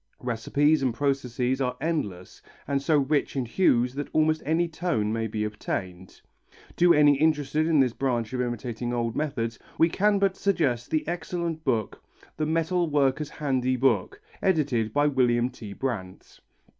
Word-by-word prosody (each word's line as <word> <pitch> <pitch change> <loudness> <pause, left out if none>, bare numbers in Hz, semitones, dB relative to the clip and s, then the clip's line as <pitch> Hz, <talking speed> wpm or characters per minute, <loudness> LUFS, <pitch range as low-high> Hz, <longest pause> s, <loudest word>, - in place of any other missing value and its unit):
Recipes 140 +6 +1
and 130 -4 0
processes 130 -1 -1
are 125 -1 -1
endless 105 - -3 0.3
and 140 0 0
so 155 +2 +2
rich 145 +1 0
in 130 -2 -1
hues 125 -3 +2
that 145 +1 -4
almost 155 0 +2
any 165 +2 +2
tone 160 -11 -1
may 115 0 -1
be 110 0 -3
obtained. 95 -3 -5 0.6
To 175 0 +5
any 145 -3 +5
interested 155 0 +1
in 160 -3 +3
this 125 -3 +1
branch 120 -4 -1
of 125 - -1
imitating 120 0 -3
old 115 -1 -1
metals 115 -7 -2 0.2
we 165 - +4
can 205 +4 +2
but 195 -1 +1
suggest 145 -13 0
the 155 -1 -1
excellent 170 -1 -3
book, 115 -7 -1 0.4
The 155 - -1
Metal 165 +2 0
Worker's 145 0 +1
Handy 130 -4 -1
Book, 135 - +1 0.2
edited 140 - +1
by 145 +5 +2
William 125 -3 +2
T. 110 -5 -10
Brannt. 105 -9 -5
135 Hz, 155 wpm, -26 LUFS, 120-155 Hz, 0.6 s, To